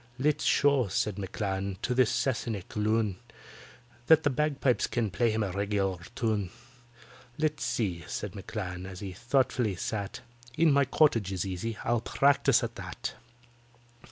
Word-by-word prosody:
"Let's 145 +3 +1
show," 140 -5 +4
said 100 +2 -1
M'CLAN, 95 0 -3
"to 125 - +1
this 125 -2 +4
Sassenach 115 -7 -2
loon 105 -2 +1 0.9
That 160 0 +6
the 145 - +2
bagpipes 140 -2 +1
can 115 -4 -1
play 115 +6 +2
him 110 0 0
a 100 - -2
regular 100 -1 -1 0.2
tune. 110 -5 0 0.9
Let's 155 -2 0
see," 90 -7 -1
said 105 -2 -4
M'CLAN, 95 -2 -5
as 95 -1 -8
he 100 -2 -5
thoughtfully 120 -1 +1
sat, 100 +2 -4 0.4
"'In 160 -3 +5
my 140 0 +4
Cottage' 120 -8 +3
is 95 -2 -2
easy—I'll 110 +5 -2
practise 140 +4 +3
at - - -4
that." - - -5
110 Hz, 140 wpm, -29 LUFS, 95-130 Hz, 0.9 s, That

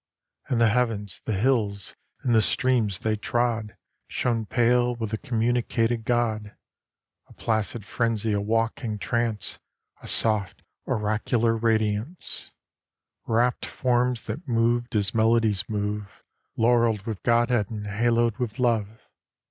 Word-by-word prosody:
And 125 -4 +1
the 115 -1 +5
heavens, 110 -4 -1
the 110 - -1
hills, 105 -4 0 0.3
and 125 -3 +2
the 110 - +6
streams 120 -5 +2
they 110 -1 +1
trod 115 -1 -1 0.3
Shone 115 -3 -1
pale 120 +1 +2
with 110 -3 -4
th' 110 - -3
communicated 115 -1 0
God. 110 -4 0 0.7
A - - -17
placid 110 -1 -2
frenzy, 115 -2 0
a 100 - 0
waking 115 0 -1
trance, 115 0 -1 0.4
A - - -10
soft 110 -4 +1 0.2
oracular 110 +2 +1
radiance, 110 - -1 0.8
Wrapped 120 +2 +1
forms 125 -1 +1
that 110 - -6
moved 120 0 +1
as 105 0 +2
melodies 110 -3 +2
move, 105 -1 -4 0.3
Laurelled 115 -3 +3
with 110 -4 -4
Godhead 120 -3 +2
and 105 -2 -5
haloed 115 +2 +1
with 115 -4 -3
Love. 110 -3 0
115 Hz, 125 wpm, -25 LUFS, 105-120 Hz, 0.8 s, the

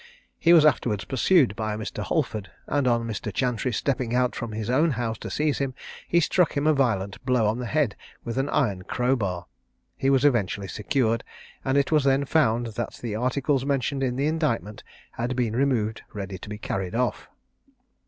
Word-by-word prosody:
He 170 - +4
was 165 -3 +7
afterwards 115 -8 +2
pursued 135 - +3
by 110 -1 -2
a - - -5
Mr. 110 - -5
Holford, 115 - -1 0.2
and 140 -2 0
on 115 -1 +2
Mr. 105 -1 -4
Chantrey 125 +2 0
stepping 125 0 -1
out 125 0 +2
from 120 -2 -4
his 110 0 -4
own 140 +7 +3
house 115 -3 -2
to - - -6
seize 150 -1 0
him, 135 -2 -2 0.3
he 170 - +3
struck 170 0 +2
him 140 - 0
a 155 - +5
violent 100 -8 0
blow 125 -3 +2
on 110 +3 0
the 125 - -3
head 145 -5 +1 0.3
with 120 +2 -3
an 135 +2 0
iron 100 -9 +1
crowbar. 100 -5 -1 0.5
He 135 - 0
was 135 0 +3
eventually 105 -7 +1
secured, 115 +2 0 0.4
and 135 +1 +1
it 140 +1 +2
was 155 -2 +4
then 135 +1 +3
found, 120 -6 +2
that 115 0 -4
the 115 -3 -5
articles 130 +3 0
mentioned 140 0 -1
in 125 -2 0
the 135 +2 0
indictment 150 -10 -1 0.3
had 120 +2 -3
been 120 -3 0
removed 120 -5 +1
ready 95 -3 -5
to 100 - -9
be 105 - -5
carried 95 -2 -3
off. 125 +1 -1
125 Hz, 190 wpm, -25 LUFS, 110-140 Hz, 0.5 s, was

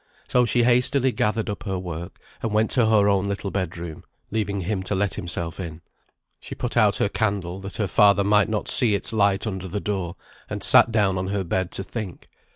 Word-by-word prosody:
So 125 -1 +3
she 120 +2 +2
hastily 125 +2 +2
gathered 110 -1 -1
up 105 - -5
her 95 -2 -3
work, 85 -1 -7 0.2
and 115 - -2
went 110 +1 +1
to 120 -4 +3
her 105 -2 +4
own 100 -1 +2
little 100 -1 -4
bed 90 -4 -3
room, 85 -2 -8 0.3
leaving 100 -2 -2
him 95 +2 -2
to 95 +2 -2
let 95 -2 0
himself 85 -1 -4
in. 85 -3 -7 0.6
She - - -9
put - - -4
out - - +3
her - - +1
candle, 95 -4 -2
that 100 0 -8
her 105 - 0
father 100 +1 +4
might 105 +1 +3
not 110 -1 -2
see 115 -5 +4
its 100 - 0
light 100 -2 +2
under 95 -3 -4
the 100 +3 -4
door; 95 -4 -3 0.3
and - - -4
sat - - +7
down 100 -4 +1
on 95 - -3
her 100 0 -2
bed 95 +1 -2
to 95 - -3
think. 105 -3 -7
100 Hz, 215 wpm, -23 LUFS, 95-110 Hz, 0.6 s, sat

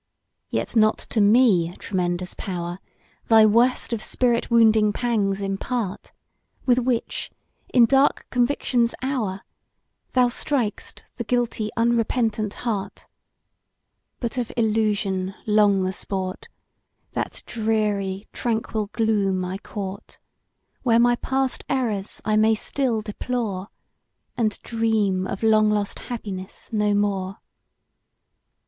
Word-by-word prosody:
Yet - - -2
not 215 -1 +4 0.2
to 220 - +3
me, 205 -6 +4
tremendous 180 -1 -2
Power! 175 -1 -5 0.5
Thy 220 -1 +7
worst 235 +3 +3
of 225 - -2
spirit 240 0 +1
wounding 220 -2 +5
pangs 205 -4 0
impart, 195 +1 -3 0.5
With 250 -1 +4
which, 245 -2 -1 0.4
in 240 -2 +6
dark 270 +4 +3
conviction's 245 -1 +1
hour, 220 -8 -2 0.7
Thou 250 -1 +5
strik'st 240 -4 -2
the 235 - -2
guilty 235 -2 -1
unrepentant 230 -2 +1
heart; 200 -4 -3 1.1
But 245 +1 -2
of 240 - -3
illusion 210 -4 0
long 210 -2 +4
the 185 0 -1
sport, 190 -1 -3 0.6
That - - -4
dreary, 210 -3 -1
tranquil 220 -2 -1
gloom 200 -5 +1
I 185 +2 -4
court, 200 -2 -7 0.6
Where 230 -3 +3
my 240 0 +4
past 265 0 -1
errors 220 -7 -2
I 215 0 +2
may 220 +1 +4
still 235 0 -1
deplore, 210 -3 -3 0.7
And 220 -4 0
dream 215 -5 0
of 195 - -5
long 215 -1 +4
lost 205 -1 -1
happiness 200 -3 -6
no 210 -1 +2
more! 195 -1 -1
215 Hz, 110 wpm, -23 LUFS, 195-235 Hz, 1.1 s, Thy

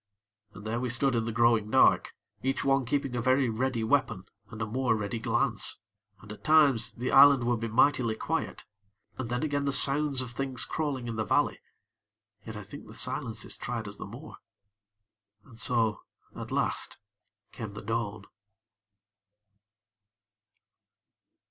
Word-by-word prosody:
And 105 - -11
there 115 +2 -2
we 125 0 -2
stood 130 +3 +1
in 115 -1 0
the 115 - -2
growing 115 -2 +2
dark, - - +3 0.3
each 135 +1 -1
one 135 -1 +2
keeping 140 -1 -1
a 120 - -1
very 130 +1 +2
ready 115 +1 -1
weapon, 115 -5 0 0.2
and 110 - -10
a 110 - -1
more 120 +2 0
ready 105 +2 -3
glance. 115 +1 +1 0.4
And 105 - -12
at 105 - -11
times 145 -7 +4
the 125 +2 -3
island 140 -2 +7
would 120 -1 0
be 115 - -3
mightily 120 0 +2
quiet, - - -3 0.5
and 125 -3 -4
then 125 +3 -2
again 145 -2 -1
the 140 - +1
sounds 140 0 +3
of 125 -2 -6
things 130 0 -2
crawling 140 -6 -3
in 115 -1 -4
the 110 - 0
valley. - - +1 0.8
Yet, - - -8
I - - -7
think - - -11
the - - -12
silences 110 -1 -2
tried 115 -3 -5
us 100 0 -8
the - - -7
more. - - -11 1.1
And 115 -4 -15
so 115 -4 +1 0.3
at - - -8
last - - -2 0.5
came 110 -3 -7
the 105 - -9
dawn. 110 -3 -3
120 Hz, 155 wpm, -28 LUFS, 110-135 Hz, 1.1 s, island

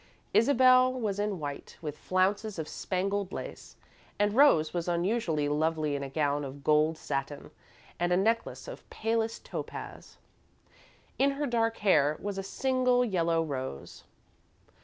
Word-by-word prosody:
Isabel 255 +1 +5
was 215 -6 -2
in 205 -2 -1
white, 145 -2 -7
with 150 -3 -5
flounces 195 +5 0
of 160 -2 -4
spangled 195 +2 -2
lace, - - -8 0.4
and 205 0 +1
Rose 220 - +5
was 175 -1 -2
unusually 175 -3 0
lovely 155 0 0
in 140 - -3
a 140 - -5
gown 145 0 0
of 135 -1 -6
old 140 - -15
gold 155 +2 +3
satin 140 -1 -4 0.5
and 175 +1 0
a 180 - +4
necklace 225 - 0
of - - -10
palest 225 0 -2
topaz. - - -7 1.0
In 275 +1 +4
her 290 +1 -2
dark 230 -3 0
hair 150 -5 +4
was 200 -1 -4
a - - -1
single 250 +4 +1
yellow 170 -6 +1
rose. 130 - -6
185 Hz, 145 wpm, -29 LUFS, 155-225 Hz, 1.0 s, Isabel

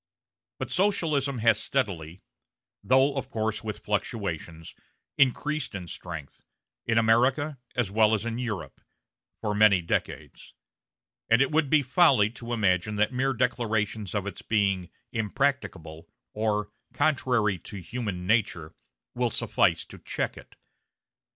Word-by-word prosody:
But - - -5
Socialism 155 -9 +1
has 115 -1 +5
steadily 95 - -2 0.6
though 130 +2 +4
of 135 -1 -3
course 110 -3 -2
with 105 -2 -6
fluctuations 95 - -3 0.4
increased 145 0 +1
in 90 -3 -6
strength, 75 -3 -8 0.5
in 115 - +2
America 125 +6 +3 0.2
as 120 -6 0
well 110 +1 +4
as 110 - -3
in 115 0 -3
Europe, 115 -6 -5 0.6
for 105 -2 -1
many 105 -2 +5
decades; 85 - -4 0.7
and 115 +1 +5
it 135 +2 +3
would 155 -2 +2
be 150 -1 +4
folly 130 - +4
to 120 0 -8
imagine 105 -2 +1
that 105 +4 +1
mere 135 +2 +1
declarations 110 -5 -1
of 100 -2 -1
its 100 -3 -6
being 100 -5 0 0.2
"impracticable," 110 - -2 0.3
or 105 -1 -1 0.2
"contrary 120 - +1
to 100 - -9
human 95 -2 -4
nature," 95 -7 0 0.4
will 120 -1 0
suffice - - +1
to - - -13
check - - -3
it. - - -14
110 Hz, 130 wpm, -27 LUFS, 100-130 Hz, 0.7 s, has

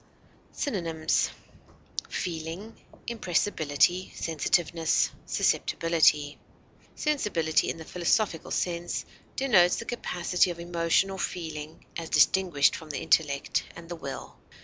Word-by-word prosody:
Synonyms: 165 - 0 0.8
feeling, 170 +5 -4 0.3
impressibility, 180 -5 +1
sensitiveness, 165 0 +1 0.2
susceptibility. 155 -3 +2 0.6
Sensibility 205 - +1
in - - -3
the 160 - -9
philosophical 180 0 0
sense, 175 -1 -2 0.3
denotes 190 -10 +4
the 230 - -5
capacity 180 -6 0
of 170 -1 -5
emotion 170 +2 +1
or 190 - -6
feeling, 160 -4 -5
as 165 -1 -5
distinguished 175 -7 +4
from 160 - -9
the 145 - -3
intellect 140 -3 +1
and 165 - -11
the 175 - -4
will. 140 -4 -7
170 Hz, 100 wpm, -28 LUFS, 160-185 Hz, 0.8 s, denotes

